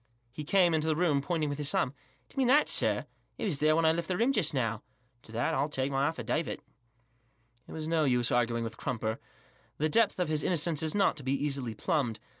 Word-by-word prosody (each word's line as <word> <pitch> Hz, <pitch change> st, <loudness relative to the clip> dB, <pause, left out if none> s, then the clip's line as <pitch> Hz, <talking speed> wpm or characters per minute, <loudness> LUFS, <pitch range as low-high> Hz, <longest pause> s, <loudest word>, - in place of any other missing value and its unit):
He 150 Hz, +4 st, -7 dB
came 175 Hz, +2 st, +3 dB
into 160 Hz, 0 st, 0 dB
the 155 Hz, -, +2 dB
room, 155 Hz, -4 st, +2 dB
pointing 160 Hz, 0 st, -1 dB
with 145 Hz, 0 st, -4 dB
his 145 Hz, -1 st, 0 dB
thumb, 125 Hz, -, +1 dB, 0.2 s
" -, -, -37 dB
Do -, -, -22 dB
you -, -, -25 dB
mean 260 Hz, -, +3 dB
that, 290 Hz, +4 st, +5 dB
sir? -, -, +2 dB, 0.3 s
It -, -, -5 dB
wasn't 170 Hz, -10 st, 0 dB
there 155 Hz, +1 st, +3 dB
when 165 Hz, 0 st, +2 dB
I 160 Hz, -, +6 dB
left 170 Hz, +1 st, -2 dB
the 180 Hz, -, -1 dB
room 240 Hz, +6 st, +2 dB
just 185 Hz, -, +2 dB
now; 115 Hz, -5 st, -1 dB, 0.4 s
to 110 Hz, -, -16 dB
that 115 Hz, +2 st, -1 dB
I'll 140 Hz, +3 st, 0 dB
take 135 Hz, -1 st, -2 dB
my 135 Hz, +1 st, +1 dB
affidavit," 160 Hz, -1 st, -2 dB, 1.0 s
It -, -, -9 dB
is 155 Hz, -1 st, -4 dB
no 160 Hz, -1 st, +2 dB
use 125 Hz, -3 st, +2 dB
arguing 115 Hz, -1 st, +1 dB
with 115 Hz, 0 st, -6 dB
Crumper, 110 Hz, -2 st, -3 dB, 0.6 s
The 155 Hz, +1 st, 0 dB
depth 225 Hz, +5 st, +2 dB
of 180 Hz, -, 0 dB
his 155 Hz, -1 st, 0 dB
innocence 165 Hz, -2 st, +1 dB
is 160 Hz, +2 st, -1 dB
not 200 Hz, -5 st, +2 dB
to 145 Hz, -, -5 dB
be 130 Hz, +1 st, 0 dB
easily 135 Hz, -5 st, -2 dB
plumbed. 130 Hz, -, -1 dB
150 Hz, 235 wpm, -30 LUFS, 130-165 Hz, 1.0 s, I